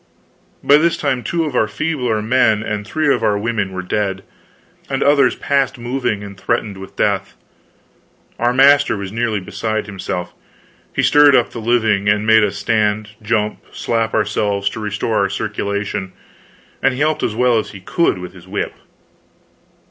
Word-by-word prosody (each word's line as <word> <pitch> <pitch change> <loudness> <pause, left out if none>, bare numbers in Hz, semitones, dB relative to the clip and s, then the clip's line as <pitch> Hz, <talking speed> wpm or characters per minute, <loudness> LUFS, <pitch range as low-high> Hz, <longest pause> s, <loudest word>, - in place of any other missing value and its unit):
By 145 - +6
this 170 +2 +2
time 135 -4 -1
two 165 +5 -1
of 145 -4 -4
our 110 - +3
feebler 125 -4 -1
men 110 -2 +2
and 105 -1 -4
three 150 +4 +1
of - - -2
our 105 - +2
women 105 -2 -2
were 95 0 -5
dead, 95 0 -2 0.7
and - - 0
others 140 -2 +4
past 135 -2 0
moving 120 -4 -2
and 100 -1 -9
threatened 100 +1 -2
with 95 0 -11
death. - - 0 1.0
Our 120 +1 +2
master 140 0 +5
was 100 -1 -6
nearly 115 -1 -1
beside 105 +3 -3
himself. 90 -3 -5 0.6
He - - -1
stirred 145 -1 +6
up 120 - +2
the 115 - -7
living, 110 -3 +2
and 105 +1 +1
made 110 0 +5
us 100 - -1
stand, 105 +1 0
jump, 105 -1 -1
slap 115 -1 -1
ourselves, 100 -1 0
to 115 - -7
restore 105 +1 -2
our 100 -1 +1
circulation, 100 -2 -3 0.7
and 135 -1 +2
he - - -6
helped 155 0 +1
as 110 - -1
well 120 -1 +3
as - - -5
he 100 - -10
could 130 - 0
with 90 0 -8
his 90 -1 -15
whip. 100 +2 -3
110 Hz, 170 wpm, -18 LUFS, 100-125 Hz, 1.0 s, By